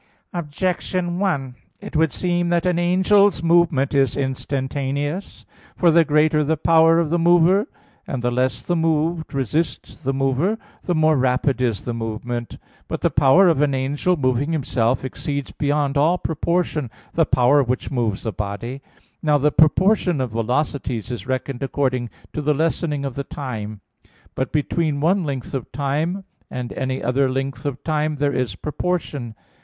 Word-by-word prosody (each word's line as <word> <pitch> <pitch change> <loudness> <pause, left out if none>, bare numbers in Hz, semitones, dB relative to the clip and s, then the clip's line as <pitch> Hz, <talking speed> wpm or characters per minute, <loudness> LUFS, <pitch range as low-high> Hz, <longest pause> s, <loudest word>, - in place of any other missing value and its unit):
Objection 175 +2 -2
1: 140 -10 -1 0.3
It - - -9
would 160 -1 +3
seem 175 +1 0
that 175 0 +1
an 180 -1 +2
angel's 190 +3 +3
movement 165 -5 +3
is 135 -3 +2
instantaneous. 140 +4 -3 0.3
For 175 -2 +4
the 165 +1 +6
greater 150 0 +3
the 155 +2 0
power 165 +1 +5
of 165 -2 +1
the 175 - +2
mover, 175 +4 +4 0.4
and 130 -3 -4
the 120 - +1
less 130 +1 -1
the 175 - 0
moved 160 0 0
resist 140 +5 -2
the 135 - 0
mover, 135 +10 0 0.3
the 175 - 0
more 155 0 +4
rapid 130 0 +1
is 115 -5 -1
the 120 - -2
movement. 115 +1 -4 0.3
But - - -4
the - - +2
power 145 +8 +5
of 160 -5 +3
an 145 -2 +2
angel 145 +7 0
moving 135 +3 0
himself 130 -4 0
exceeds 140 +2 -4
beyond 145 -1 0
all 165 +5 +3
proportion 160 -4 -1 0.2
the 165 -2 +2
power 130 +3 +4
which 125 0 -2
moves 115 -7 -1
a 110 - -1
body. 105 +6 -5 0.4
Now 150 -2 +3
the 150 +1 +2
proportion 180 +2 +3
of 130 -3 -2
velocities 125 0 -2
is 120 +1 -6
reckoned 130 0 -3
according 130 -3 -1 0.2
to 150 - -2
the 150 0 +1
lessening 155 -2 -1
of 135 - -3
the 140 - -4
time. 110 -8 -6 0.5
But 130 - -2
between 150 0 0
one 180 +5 +2
length 135 -5 -4
of 130 -4 -4
time 150 +8 -1 0.3
and 125 -1 -5
any 130 0 -3
other 130 +3 +2
length 135 0 -3
of 135 -2 -5
time 155 -1 0
there 145 0 0
is 125 -6 -1
proportion. 150 - -3
145 Hz, 160 wpm, -21 LUFS, 130-165 Hz, 0.5 s, the